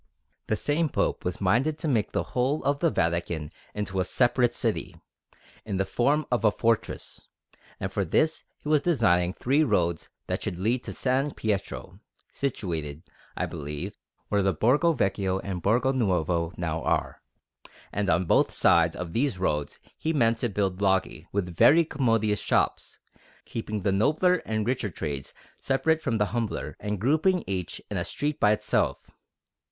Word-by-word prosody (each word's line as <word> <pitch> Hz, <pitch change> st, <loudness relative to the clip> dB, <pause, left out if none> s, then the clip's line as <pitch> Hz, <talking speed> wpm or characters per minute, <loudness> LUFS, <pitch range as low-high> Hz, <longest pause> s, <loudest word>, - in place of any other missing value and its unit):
The 110 Hz, -, +1 dB
same 150 Hz, +7 st, +1 dB
Pope -, -, -1 dB
was -, -, -3 dB
minded 150 Hz, +7 st, +2 dB
to 160 Hz, -, -3 dB
make 115 Hz, -7 st, +1 dB
the -, -, 0 dB
whole 130 Hz, +5 st, +1 dB
of 140 Hz, 0 st, +1 dB
the 165 Hz, -, +3 dB
Vatican 85 Hz, -, -1 dB, 0.2 s
into 100 Hz, -2 st, -2 dB
a -, -, +3 dB
separate 120 Hz, +4 st, +2 dB
city, -, -, -1 dB, 0.7 s
in 100 Hz, -3 st, -3 dB
the 95 Hz, -, +1 dB
form 145 Hz, +9 st, +1 dB
of 120 Hz, -1 st, +1 dB
a 110 Hz, -, +6 dB
fortress; 115 Hz, +1 st, -2 dB, 0.5 s
and 95 Hz, 0 st, -4 dB
for 100 Hz, -, +1 dB
this 155 Hz, -, +1 dB
he -, -, -11 dB
was 150 Hz, -1 st, +3 dB
designing 100 Hz, -, +2 dB
three 135 Hz, +10 st, +2 dB
roads 85 Hz, -, 0 dB, 0.2 s
that -, -, -3 dB
should 85 Hz, -, -4 dB
lead 115 Hz, +7 st, 0 dB
to -, -, -5 dB
S. 135 Hz, +2 st, 0 dB
Pietro, 105 Hz, -3 st, -3 dB, 0.3 s
situated, 80 Hz, -, -3 dB, 0.3 s
I -, -, 0 dB
believe, 75 Hz, 0 st, -6 dB, 0.3 s
where 100 Hz, -1 st, +2 dB
the 95 Hz, -2 st, +1 dB
Borgo 145 Hz, -, +3 dB
Vecchio 95 Hz, -6 st, 0 dB
and 95 Hz, -2 st, -4 dB
the -, -, -7 dB
Borgo 120 Hz, +8 st, +2 dB
Nuovo 90 Hz, -8 st, 0 dB
now 80 Hz, -2 st, -2 dB
are; -, -, -1 dB, 0.7 s
and 100 Hz, -1 st, -1 dB
on 85 Hz, +3 st, +2 dB
both -, -, +3 dB
sides 85 Hz, -1 st, +3 dB
of 85 Hz, -2 st, -6 dB
these 130 Hz, -4 st, 0 dB
roads 75 Hz, -6 st, -1 dB, 0.2 s
he 160 Hz, +1 st, -1 dB
meant 115 Hz, -5 st, +2 dB
to 120 Hz, -, 0 dB
build 100 Hz, -2 st, -1 dB
loggie, 95 Hz, -4 st, 0 dB
with 90 Hz, -4 st, -2 dB
very 165 Hz, -, +6 dB
commodious 115 Hz, -8 st, +1 dB
shops, -, -, 0 dB, 0.5 s
keeping 105 Hz, -3 st, -4 dB
the 100 Hz, -, +2 dB
nobler 155 Hz, -, +3 dB
and 110 Hz, -1 st, -1 dB
richer 125 Hz, -3 st, -1 dB
trades 70 Hz, -6 st, -5 dB, 0.3 s
separate 160 Hz, +4 st, +1 dB
from 115 Hz, -7 st, 0 dB
the 105 Hz, -, +2 dB
humbler, 115 Hz, -3 st, -2 dB
and 105 Hz, -1 st, -3 dB
grouping 160 Hz, -, +2 dB
each 95 Hz, -3 st, -4 dB
in -, -, -1 dB
a -, -, 0 dB
street 150 Hz, 0 st, -3 dB
by 105 Hz, -, +5 dB
itself. 105 Hz, -, +1 dB
105 Hz, 170 wpm, -27 LUFS, 90-135 Hz, 0.7 s, a